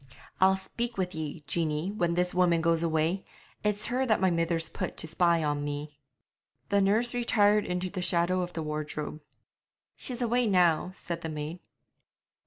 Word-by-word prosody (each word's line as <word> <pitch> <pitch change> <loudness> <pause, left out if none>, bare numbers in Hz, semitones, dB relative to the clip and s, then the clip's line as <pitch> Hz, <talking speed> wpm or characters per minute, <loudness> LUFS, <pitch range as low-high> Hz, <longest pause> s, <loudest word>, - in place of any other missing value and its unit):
'I'll 190 +1 +5
speak 235 +5 -4
with 185 -1 -1
ye, 155 -1 -5
Jeanie, 160 +2 -1
when 175 -5 0
this 180 0 +2
woman 180 -2 +3
goes 165 0 +2
away; 165 +3 0 0.4
it's 210 0 0
her 250 +3 0
that 220 - +3
my 190 -1 +3
mither's 165 -1 0
put - - -5
to - - -2
spy 170 0 +2
on 145 -1 -1
me.' 145 +1 -5 0.7
The 200 0 +3
nurse 220 +5 +2
retired 210 -3 +3
into 180 +1 -1
the 185 - -4
shadow 180 +1 +2
of 180 0 -4
the 160 - -3
wardrobe. 150 0 -4 0.7
'She's 250 -1 -3
away 240 +1 +2
now,' 180 -4 +3
said 170 -3 -5
the 160 - -4
maid. 155 +3 -5
175 Hz, 170 wpm, -29 LUFS, 160-200 Hz, 0.7 s, I'll